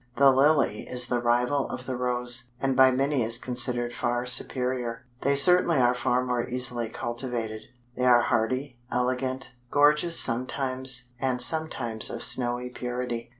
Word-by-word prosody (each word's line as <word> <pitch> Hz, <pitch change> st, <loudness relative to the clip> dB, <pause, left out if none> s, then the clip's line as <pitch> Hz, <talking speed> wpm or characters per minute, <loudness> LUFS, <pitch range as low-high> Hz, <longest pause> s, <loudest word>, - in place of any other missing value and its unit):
The 140 Hz, -1 st, +5 dB
Lily 135 Hz, -5 st, +2 dB
is 125 Hz, 0 st, +1 dB
the 125 Hz, -, 0 dB
rival 125 Hz, +4 st, 0 dB
of 125 Hz, -, -7 dB
the 130 Hz, 0 st, -4 dB
Rose, 125 Hz, 0 st, +2 dB
and 135 Hz, -1 st, -1 dB
by 130 Hz, 0 st, +6 dB
many 135 Hz, +1 st, 0 dB
is 115 Hz, +1 st, 0 dB
considered 120 Hz, -1 st, -2 dB
far 120 Hz, +1 st, -2 dB
superior. 125 Hz, -1 st, 0 dB, 0.2 s
They 140 Hz, 0 st, +1 dB
certainly 175 Hz, +2 st, +4 dB
are 125 Hz, -1 st, +3 dB
far 125 Hz, +1 st, -1 dB
more 125 Hz, -1 st, -2 dB
easily 125 Hz, -2 st, -1 dB
cultivated. 120 Hz, -2 st, -5 dB, 0.3 s
They 125 Hz, -, -1 dB
are 120 Hz, -1 st, +5 dB
hardy, 120 Hz, +3 st, -2 dB
elegant, 130 Hz, +1 st, -2 dB, 0.2 s
gorgeous 150 Hz, +4 st, +2 dB
sometimes, 130 Hz, 0 st, -1 dB
and 130 Hz, -1 st, -1 dB
sometimes 125 Hz, -6 st, 0 dB
of -, -, -4 dB
snowy 125 Hz, 0 st, 0 dB
purity. 125 Hz, -1 st, -5 dB
125 Hz, 150 wpm, -26 LUFS, 120-130 Hz, 0.3 s, by